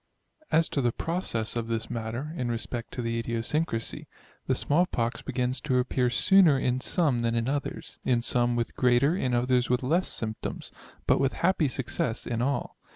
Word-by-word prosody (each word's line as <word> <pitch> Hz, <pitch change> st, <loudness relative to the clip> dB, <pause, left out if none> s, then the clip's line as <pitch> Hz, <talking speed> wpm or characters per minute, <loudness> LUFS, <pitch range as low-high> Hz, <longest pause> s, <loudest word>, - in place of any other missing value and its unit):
As 160 Hz, +1 st, +4 dB
to 140 Hz, -, -1 dB
the 120 Hz, -2 st, +2 dB
process 120 Hz, -10 st, -2 dB
of 115 Hz, -1 st, -2 dB
this 115 Hz, -1 st, -2 dB
matter, 120 Hz, +6 st, -4 dB
in 125 Hz, -6 st, -2 dB
respect 120 Hz, +1 st, -4 dB
of 125 Hz, -, -2 dB
the 115 Hz, 0 st, -1 dB
idiosyncrasy; 115 Hz, +2 st, -2 dB, 0.4 s
the -, -, +2 dB
small 170 Hz, +5 st, +2 dB
pox 115 Hz, -6 st, -2 dB
begins 130 Hz, 0 st, -2 dB
to 130 Hz, -4 st, +1 dB
appear 125 Hz, 0 st, +1 dB
sooner 170 Hz, +4 st, +5 dB
in 130 Hz, -1 st, 0 dB
some 150 Hz, -8 st, +1 dB
than 115 Hz, 0 st, 0 dB
in 115 Hz, +1 st, 0 dB
others, 140 Hz, +1 st, -4 dB
in 120 Hz, -2 st, +1 dB
some 120 Hz, -1 st, +2 dB
with 120 Hz, -1 st, -2 dB
greater, 125 Hz, +6 st, +3 dB
in 130 Hz, -9 st, 0 dB
others 125 Hz, 0 st, +2 dB
with 125 Hz, +1 st, +1 dB
less 170 Hz, +8 st, +1 dB
symptoms; 110 Hz, -1 st, -4 dB, 0.3 s
but -, -, +3 dB
with 135 Hz, 0 st, +1 dB
happy 170 Hz, -3 st, +2 dB
success 120 Hz, -3 st, -2 dB
in 115 Hz, -1 st, -2 dB
all. 140 Hz, +3 st, -2 dB
125 Hz, 180 wpm, -27 LUFS, 115-140 Hz, 0.4 s, sooner